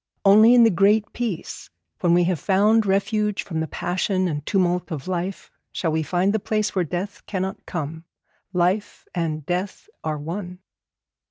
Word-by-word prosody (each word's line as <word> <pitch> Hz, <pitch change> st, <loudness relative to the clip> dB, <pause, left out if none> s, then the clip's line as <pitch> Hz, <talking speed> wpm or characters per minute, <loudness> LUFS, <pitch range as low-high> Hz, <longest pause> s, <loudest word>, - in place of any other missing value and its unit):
Only 215 Hz, +5 st, +7 dB
in 240 Hz, -, +7 dB
the 225 Hz, -, +5 dB
Great 200 Hz, +4 st, +3 dB
Peace, 230 Hz, -8 st, -4 dB, 0.3 s
when 170 Hz, -1 st, +3 dB
we 175 Hz, -, +4 dB
have 175 Hz, -2 st, 0 dB
found 210 Hz, +5 st, +3 dB
refuge 210 Hz, +1 st, 0 dB
from 160 Hz, -4 st, -4 dB
the 160 Hz, -, -1 dB
passion 185 Hz, +3 st, -1 dB
and 150 Hz, -4 st, -3 dB
tumult 180 Hz, -2 st, +1 dB
of 150 Hz, -2 st, -5 dB
life, 185 Hz, +1 st, -4 dB, 0.2 s
shall 165 Hz, -, -1 dB
we 160 Hz, +1 st, 0 dB
find 180 Hz, +6 st, +1 dB
the 220 Hz, -, +1 dB
place 215 Hz, 0 st, -1 dB
where 185 Hz, -, +1 dB
death 180 Hz, +5 st, -5 dB
cannot 190 Hz, -1 st, -4 dB
come. 160 Hz, 0 st, -5 dB, 0.5 s
Life 185 Hz, +3 st, 0 dB
and 155 Hz, -4 st, -2 dB
death 180 Hz, -, -3 dB, 0.2 s
are 155 Hz, -1 st, -2 dB
one. 175 Hz, +4 st, -6 dB
185 Hz, 165 wpm, -23 LUFS, 170-205 Hz, 0.5 s, Only